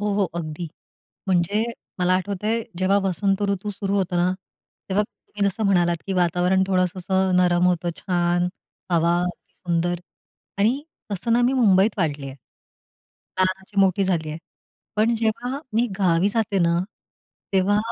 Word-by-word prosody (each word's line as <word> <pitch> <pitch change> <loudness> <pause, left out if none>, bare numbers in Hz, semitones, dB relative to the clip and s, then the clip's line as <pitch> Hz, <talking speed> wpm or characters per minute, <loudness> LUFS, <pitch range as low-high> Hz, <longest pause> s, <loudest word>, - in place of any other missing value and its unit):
हो, 210 0 0
हो, 205 - +2
अगदी. 165 0 -4 0.6
म्हणजे 190 +4 +2 0.3
मला 180 0 +3
आठवतंय, 205 +4 -1 0.2
जेव्हा 190 +2 +3
वसंत 195 +2 +1
ऋतू 200 +1 -2
सुरु 200 0 -3
होतो 185 -2 0
ना, 175 +1 +2 0.6
तेव्हा 200 +2 +2
तुम्ही 205 -1 -3
जसं 200 +3 -4
म्हणालात, 175 -3 +3
की 195 - -2
वातावरण 180 +1 +2
थोडंस 185 -2 +1
असं 190 0 +1
नरम 180 -1 +4
होतं 175 -1 +1
छान, 175 -1 +1 0.4
हवा 170 0 +3
अतीसुंदर 175 -1 -2 0.6
आणि 235 +8 +2 0.3
तसं 215 +4 -1
ना 240 - +4
मी 245 +2 +3
मुंबईत 215 -4 +4
वाढली 145 -5 -1
आहे. 135 - -8 1.0
लहानाची 190 +2 0
मोठी 195 0 +3
झाली 165 -5 0
आहे. 155 - -5 0.6
पण 220 +3 +3
जेव्हा 235 +4 -1 0.2
मी 235 +2 +3
गावी 180 -1 +3
जाते 210 -2 0
ना, 170 -1 +3 0.7
तेव्हा 195 +2 +3
190 Hz, 145 wpm, -23 LUFS, 175-205 Hz, 1.0 s, नरम